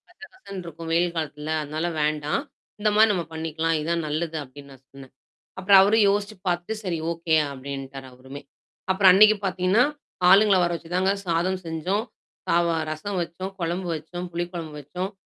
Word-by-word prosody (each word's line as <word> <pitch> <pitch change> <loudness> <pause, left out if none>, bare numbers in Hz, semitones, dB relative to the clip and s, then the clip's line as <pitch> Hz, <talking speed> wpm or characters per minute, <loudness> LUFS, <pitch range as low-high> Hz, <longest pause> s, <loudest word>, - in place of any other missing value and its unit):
கச - - -26
கசன்னு 200 - -9
இருக்கும் 165 0 -8
வெயில் 170 +1 +2
காலத்துல. 155 -1 -4
அதனால 155 +3 -3 0.2
வேண்டாம். 150 0 0 0.4
இந்த 210 0 +2
மாரி 220 +1 +6
நம்ம 180 -4 -1
பண்ணிக்கலாம். 160 0 -1
இதான் 165 +1 -1
நல்லது 160 +2 -2
அப்டீன்னு 140 +1 -14
நான் 135 0 -17
சொன்னேன். 135 -1 -14 0.5
அப்புறம் 195 +1 +7
அவரும் 210 +2 +4
யோசிச்சு 205 +1 -1
பாத்துட்டு, 175 +5 -1
"சரி 180 -4 -2
ஓகே" 165 -1 -2 0.2
அப்டின்ட்டாரு 135 0 -7
அவருமே. 130 +3 -11 0.5
அப்புறம் 190 0 +6
அன்னைக்கு 215 +3 +7
பாத்தீங்கன்னா, 185 +4 +2 0.5
ஆளுங்கள 200 +1 +6
வர 175 - +1
வச்சு 165 0 -10
தாங்க 190 +1 +2
சாதம் 180 +2 0
செஞ்சோம். 165 +6 -1 0.4
சாவா 170 -1 +2
ரசம் 170 +6 -4
வச்சோம், 175 +3 -5
கொழம்பு 175 +2 -2
வச்சோம், 175 +4 -6
புளி 175 +1 -2
கொழம்பு 165 -3 -6
வச்சோம். 180 +7 -5
170 Hz, 160 wpm, -24 LUFS, 155-190 Hz, 0.5 s, அப்புறம்